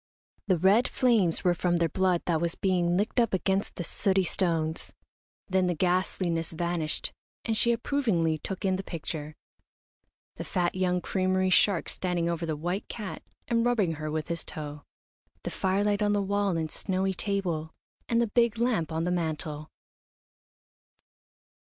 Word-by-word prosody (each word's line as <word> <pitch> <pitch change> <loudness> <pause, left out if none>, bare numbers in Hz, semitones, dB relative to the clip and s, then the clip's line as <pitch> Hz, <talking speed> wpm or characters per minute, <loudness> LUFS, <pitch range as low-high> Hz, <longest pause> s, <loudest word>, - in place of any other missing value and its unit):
The 185 -3 +3
red 195 +8 +4
flames 225 -10 +2
were 180 - +4
from 175 0 +1
their 170 -1 +2
blood 180 +1 +1
that 165 -2 +1
was 170 -1 0
being 180 -2 +1
licked 210 +5 +1
up 230 -5 +3
against 190 +1 0
the 175 - -4
sooty 190 +2 +1
stones. 165 -3 0 0.6
Then 185 -1 +2
the 175 - 0
ghastliness 175 -1 0
vanished, 170 -2 -2 0.3
and 225 - 0
she 235 +2 +3
approvingly 220 - +1
took 190 +5 -5
in 190 -1 +2
the 195 - -4
picture, 155 -3 -5 1.0
the - - -4
fat 175 -2 0
young 180 -1 +1
creamery 185 0 +1
shark 185 -1 +4
standing 180 -2 -1
over 170 0 -2
the 155 -2 -2
white 175 +6 -3
cat 210 -4 -6 0.3
and 230 -1 +2
rubbing 230 -8 +2
her 155 -1 -4
with 155 0 -2
his 170 -1 -2
toe, 150 -1 -7 0.6
the - - -3
firelight 205 +2 +1
on 205 0 +3
the 205 -1 +1
wall 200 -2 +1
and 160 -2 -2
snowy 190 0 -1
table, 180 -6 -2 0.4
and 230 - +3
the 235 - +3
big 235 +1 +2
lamp 225 -10 +1
on 160 +1 -1
the 180 - 0
mantel. 155 -3 -3
180 Hz, 160 wpm, -28 LUFS, 165-200 Hz, 1.0 s, red